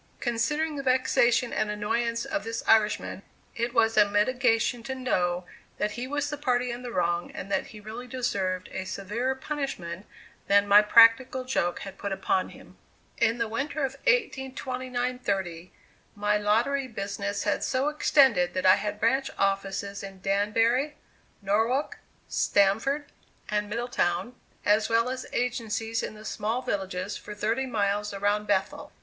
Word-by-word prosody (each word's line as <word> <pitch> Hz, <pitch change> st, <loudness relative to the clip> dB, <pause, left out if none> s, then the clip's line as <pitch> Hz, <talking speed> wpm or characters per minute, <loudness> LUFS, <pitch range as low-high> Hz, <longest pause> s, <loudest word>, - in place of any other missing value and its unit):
Considering 295 Hz, +6 st, -1 dB
the -, -, -2 dB
vexation 255 Hz, -2 st, +2 dB
and 215 Hz, -, 0 dB
annoyance 230 Hz, +3 st, -1 dB
of 305 Hz, -1 st, -2 dB
this 225 Hz, 0 st, -4 dB
Irishman, 215 Hz, -3 st, +2 dB, 0.3 s
it 235 Hz, +1 st, -1 dB
was 225 Hz, -2 st, +3 dB
a 205 Hz, -1 st, +6 dB
mitigation 235 Hz, +2 st, +2 dB
to 265 Hz, +3 st, -5 dB
know 180 Hz, -9 st, 0 dB, 0.3 s
that 210 Hz, -, -1 dB
he 245 Hz, +2 st, -5 dB
was 290 Hz, +1 st, -1 dB
the 295 Hz, -, -4 dB
party 250 Hz, -3 st, 0 dB
in 240 Hz, +1 st, -6 dB
the 245 Hz, -1 st, -6 dB
wrong 175 Hz, -3 st, 0 dB
and 195 Hz, -, -7 dB
that -, -, 0 dB
he 215 Hz, -, -11 dB
really 220 Hz, +4 st, -8 dB
deserved 190 Hz, -7 st, -2 dB
a 190 Hz, -, -4 dB
severer 230 Hz, +8 st, -2 dB
punishment 265 Hz, -, -5 dB, 0.4 s
than 200 Hz, 0 st, +4 dB
my 205 Hz, +1 st, +8 dB
practical 230 Hz, +4 st, +5 dB
joke 175 Hz, -9 st, -1 dB
had 195 Hz, -1 st, -9 dB
put 200 Hz, -, -4 dB
upon 190 Hz, -1 st, 0 dB
him. -, -, -15 dB, 0.4 s
In 230 Hz, +2 st, +2 dB
the 230 Hz, -1 st, -1 dB
winter 285 Hz, +7 st, -3 dB
of 265 Hz, -, -4 dB
1829 255 Hz, -, -1 dB
30, 185 Hz, -6 st, -3 dB, 0.4 s
my 210 Hz, 0 st, +1 dB
lottery 235 Hz, +7 st, +1 dB
business 200 Hz, -2 st, -3 dB
had 205 Hz, -, 0 dB
so 260 Hz, +2 st, 0 dB
extended 265 Hz, -11 st, +3 dB
that 185 Hz, 0 st, -1 dB
I 185 Hz, +1 st, +7 dB
had 210 Hz, 0 st, -4 dB
branch 265 Hz, +5 st, +2 dB
offices 195 Hz, 0 st, -1 dB
in 195 Hz, -1 st, -9 dB
Danbury, 225 Hz, +9 st, +1 dB, 0.5 s
Norwalk, 225 Hz, +8 st, 0 dB, 0.3 s
Stamford 225 Hz, +9 st, +2 dB, 0.4 s
and 210 Hz, 0 st, -1 dB
Middletown, 230 Hz, -3 st, -1 dB, 0.3 s
as 210 Hz, +1 st, +3 dB
well 230 Hz, +2 st, +2 dB
as 255 Hz, 0 st, -5 dB
agencies 225 Hz, -2 st, -1 dB
in -, -, -5 dB
the 215 Hz, 0 st, -12 dB
small 225 Hz, +4 st, -2 dB
villages 190 Hz, 0 st, -3 dB
for 210 Hz, -, -9 dB
thirty 225 Hz, +6 st, -1 dB
miles 205 Hz, -3 st, -1 dB
around 205 Hz, +1 st, 0 dB
Bethel. 195 Hz, -1 st, -1 dB
225 Hz, 155 wpm, -27 LUFS, 200-255 Hz, 0.5 s, my